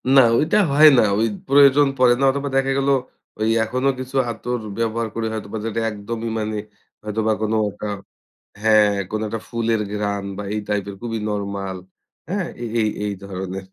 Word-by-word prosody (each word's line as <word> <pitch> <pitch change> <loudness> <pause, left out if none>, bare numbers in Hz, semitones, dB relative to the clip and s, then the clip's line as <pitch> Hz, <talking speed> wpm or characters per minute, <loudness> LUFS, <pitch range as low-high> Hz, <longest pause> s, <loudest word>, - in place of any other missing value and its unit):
না 135 - +9 0.2
ওইটা 165 +8 +2
হয় 155 +2 +7
না। - - +7 0.2
ওই 115 - +3 0.2
প্রয়োজন 140 +1 +6
পড়ে 125 -1 +5
না। - - 0
অথবা 140 +1 -3
দেখা 135 0 +2
গেলো 140 0 +2 0.5
ওই 110 +1 +1
এখনো 130 +4 -1
কিছু 130 +1 -7 0.2
আতর 125 +1 -3 0.2
ব্যবহার 115 0 -1
করে 115 -1 -1
হয়তোবা 110 0 -5
যেটা 115 0 -2
একদমই 110 +2 -5
মানে 110 0 -2 0.5
হয়তোবা 110 +1 -1
কোনো 110 0 0 0.2
একটা 105 - -7 0.8
হ্যাঁ 105 -2 +5 0.2
কোনো 110 0 -2
একটা 115 0 -4
ফুলের 115 -2 0
ঘ্রাণ 100 -1 -2
বা - - -3
এই 105 - -1
টাইপের 100 -1 -2
খুবই 115 -2 -3
নরমাল, 100 -2 -3 0.5
হ্যাঁ? 190 -1 -1 0.2
এ - - -2 0.2
এই, 110 - +2 0.2
এই 105 - -1
ধরনের। 95 0 -6
110 Hz, 170 wpm, -21 LUFS, 105-130 Hz, 0.8 s, না